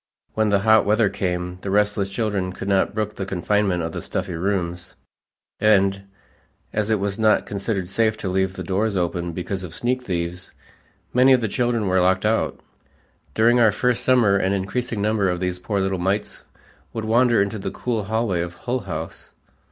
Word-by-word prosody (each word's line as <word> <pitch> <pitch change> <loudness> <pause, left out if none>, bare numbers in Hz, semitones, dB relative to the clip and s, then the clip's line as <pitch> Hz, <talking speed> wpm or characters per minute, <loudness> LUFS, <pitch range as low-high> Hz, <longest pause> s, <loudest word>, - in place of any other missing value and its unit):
When 110 -1 +1
the 100 -1 +2
hot 110 +1 +5
weather 105 0 +3
came 90 -2 -3
the 100 - -5
restless 105 0 +1
children 100 -3 -2
could 95 - -7
not 100 +1 +1
brook 105 -1 -2
the 95 - -3
confinement 95 -1 0
of 80 - -3
the - - -5
stuffy - - -4
rooms, 85 -1 -3 0.6
and, 100 -2 +3 0.7
as 105 0 0
it 110 -2 +2
was 100 +1 -2
not 110 -1 +3
considered 100 -2 -3
safe 110 +3 +1
to 100 - -5
leave 95 0 0
the 95 - -5
doors 100 +3 0
open 85 -1 -1
because 95 +3 -4
of 90 -2 -8
sneak 125 +1 -1
thieves, 90 -4 -4 0.6
many 130 +2 +6
of 125 - +3
the 110 - 0
children 120 +1 0
were 95 -1 +2
locked 95 +2 +2
out. 110 +1 0 0.8
During 120 +2 +4
our 110 -3 +5
first 125 +3 0
summer 120 -6 +4
an 95 0 +1
increasing 100 +3 -2
number 105 -2 +1
of 90 -1 -1
these 90 0 -2
poor 100 +2 -2
little 95 -1 -1
mites 100 +4 -2 0.5
would 110 -1 -4
wander 120 +1 +3
into 100 +2 0
the - - -3
cool 115 -5 -3
hallway 110 -4 0
of 85 0 -5
Hull 125 +1 -2
House. 80 -7 -7
100 Hz, 185 wpm, -22 LUFS, 95-110 Hz, 0.8 s, many